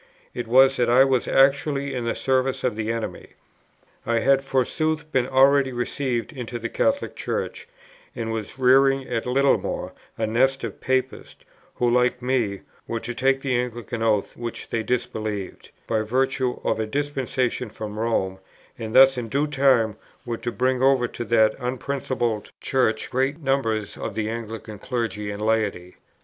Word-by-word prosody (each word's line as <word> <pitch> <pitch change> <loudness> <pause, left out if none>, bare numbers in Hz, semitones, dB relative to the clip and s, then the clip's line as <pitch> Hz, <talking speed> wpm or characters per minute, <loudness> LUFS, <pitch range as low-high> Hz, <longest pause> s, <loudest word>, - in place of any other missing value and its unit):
It 120 -2 -4
was 130 +3 +5
that 120 - +2
I 125 +2 +7
was 130 -2 +1
actually 140 +1 +2
in 125 -2 -3
the 115 - -1
service 130 0 0
of 125 -4 0
the 110 0 -2
enemy. 115 -1 -5 0.7
I 115 - 0
had 135 +1 +3
forsooth 155 +4 -1
been 125 -1 +1
already 135 +1 +4
received 120 +2 -2
into 125 -3 -5
the 115 0 -4
Catholic 280 - 0
Church, 460 0 -4 0.5
and 115 -2 -3
was 110 +2 -5
rearing 135 +1 +4
at 115 -1 -2
Littlemore 135 +2 +1 0.2
a 110 - 0
nest 130 +5 +1
of - - -6
Papists, 130 0 -2 0.3
who, 125 - +1
like 125 +1 +2
me, 120 -6 -1 0.3
were 115 - -2
to 120 +2 -5
take 135 +2 +1
the 135 -2 0
Anglican 120 -1 -3
oaths 110 -3 +1
which 120 -1 -6
they 115 - 0
disbelieved, 110 -4 -3 0.2
by 110 -1 0
virtue 130 +2 0
of - - 0
a 110 - -1
dispensation 130 -2 -2
from 105 0 -7
Rome, 95 -5 -1 0.4
and 110 -1 -5
thus 135 -1 +7
in 115 -2 -5
due 140 +5 +1
time 130 -7 +2 0.3
were 120 -1 -3
to 120 - -4
bring 130 +1 0
over 130 -2 +4
to 120 - -5
that 110 -2 +4
unprincipled 125 -3 -2
Church 125 -5 0
great 135 +3 0
numbers 115 -8 -1
of 110 - -5
the 110 0 -1
Anglican 110 -2 -7
Clergy 115 -4 -3
and 105 +1 -5
Laity. 105 -5 -1
125 Hz, 160 wpm, -24 LUFS, 115-135 Hz, 0.7 s, I